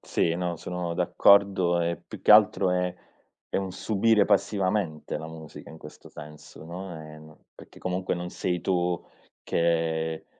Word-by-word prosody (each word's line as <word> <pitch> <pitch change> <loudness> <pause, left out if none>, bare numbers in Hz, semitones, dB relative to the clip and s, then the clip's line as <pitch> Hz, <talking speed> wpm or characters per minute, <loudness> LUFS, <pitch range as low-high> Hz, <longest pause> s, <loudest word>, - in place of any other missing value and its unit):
Sì, 85 - 0
no 90 -1 -2
sono 90 0 -4
d'accordo 95 -3 +4
e 85 -2 -2
più - - -10
che - - +2
altro 95 -2 +6
è 90 0 0 0.6
è - - +4
un 95 -1 -2
subire 105 +2 +2
passivamente 95 -5 0
la 80 - -7
musica 80 -1 -11
in 80 - -12
questo 75 - -13
senso, 75 +1 -12
no, 90 +2 -7
ehm, 75 0 -13 0.2
perché - - -15
comunque 90 0 -2
non 90 0 -5
sei 90 -1 -2
tu 90 -1 0 0.4
che, 80 -1 0
90 Hz, 150 wpm, -26 LUFS, 80-95 Hz, 0.6 s, altro